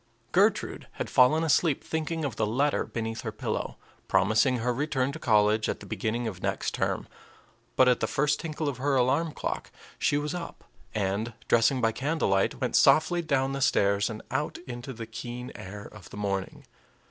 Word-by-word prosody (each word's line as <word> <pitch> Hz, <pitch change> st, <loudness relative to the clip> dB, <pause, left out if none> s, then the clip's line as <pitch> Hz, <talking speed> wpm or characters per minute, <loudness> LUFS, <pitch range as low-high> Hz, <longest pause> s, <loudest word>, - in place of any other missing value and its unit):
Gertrude -, -, +2 dB
had -, -, -5 dB
fallen 150 Hz, +6 st, +5 dB
asleep 160 Hz, -2 st, +2 dB
thinking 160 Hz, 0 st, -2 dB
of 130 Hz, -5 st, -3 dB
the 110 Hz, -, 0 dB
letter 140 Hz, +7 st, +1 dB
beneath 115 Hz, -1 st, -4 dB
her -, -, -4 dB
pillow, -, -, -3 dB, 0.3 s
promising 110 Hz, +7 st, +3 dB
her 120 Hz, +1 st, 0 dB
return 135 Hz, 0 st, 0 dB
to -, -, -8 dB
college 110 Hz, -1 st, +3 dB
at -, -, -2 dB
the -, -, -11 dB
beginning 115 Hz, +2 st, -2 dB
of 95 Hz, -5 st, -6 dB
next -, -, -1 dB
term; -, -, -1 dB, 0.7 s
but 130 Hz, -, +5 dB
at 125 Hz, -1 st, +4 dB
the -, -, 0 dB
first 150 Hz, +1 st, +1 dB
tinkle 155 Hz, -1 st, -3 dB
of 140 Hz, -, -2 dB
her 140 Hz, +2 st, +1 dB
alarm 130 Hz, +6 st, +2 dB
clock -, -, -4 dB, 0.3 s
she 145 Hz, -, +2 dB
was 150 Hz, +2 st, -2 dB
up, 175 Hz, -1 st, -6 dB, 0.3 s
and, 105 Hz, +3 st, -1 dB
dressing 120 Hz, +3 st, +3 dB
by 115 Hz, -1 st, +3 dB
candlelight, 130 Hz, -8 st, 0 dB
went -, -, -1 dB
softly 175 Hz, +3 st, +5 dB
down 135 Hz, -4 st, +1 dB
the 135 Hz, -, -3 dB
stairs 100 Hz, -5 st, +3 dB
and 110 Hz, -1 st, -7 dB
out 145 Hz, +4 st, -1 dB
into 120 Hz, +2 st, -6 dB
the 115 Hz, -2 st, -7 dB
keen 120 Hz, +2 st, -7 dB
air 100 Hz, +2 st, -8 dB
of 100 Hz, -3 st, -12 dB
the -, -, -10 dB
morning. 100 Hz, -2 st, -3 dB
125 Hz, 180 wpm, -28 LUFS, 110-145 Hz, 0.7 s, fallen